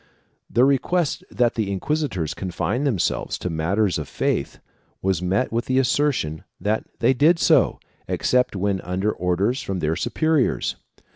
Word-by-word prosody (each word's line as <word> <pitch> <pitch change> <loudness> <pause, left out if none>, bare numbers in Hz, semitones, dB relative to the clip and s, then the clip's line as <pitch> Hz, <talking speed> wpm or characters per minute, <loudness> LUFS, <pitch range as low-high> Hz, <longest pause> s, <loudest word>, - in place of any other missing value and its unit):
The 120 +2 +4
request 140 +4 +1
that 120 -1 +1
the 105 -4 -2
inquisitors 100 - -1
confine 100 +8 -2
themselves 115 -11 0
to 90 - -4
matters 90 +4 +1
of 75 - -5
faith - - -1 0.5
was 95 -3 +1
met 95 +7 0
with 115 +2 -1
the 130 - 0
assertion 130 - +1 0.2
that 110 +2 -1
they 130 - +3
did 155 +7 +4
so, - - +3 0.3
except 125 -3 +1
when 95 0 0
under 95 +4 -1
orders 95 +9 0
from 95 -5 -3
their 80 -2 0
supe - - -4
riors. 155 -4 +2
105 Hz, 150 wpm, -23 LUFS, 90-130 Hz, 0.5 s, The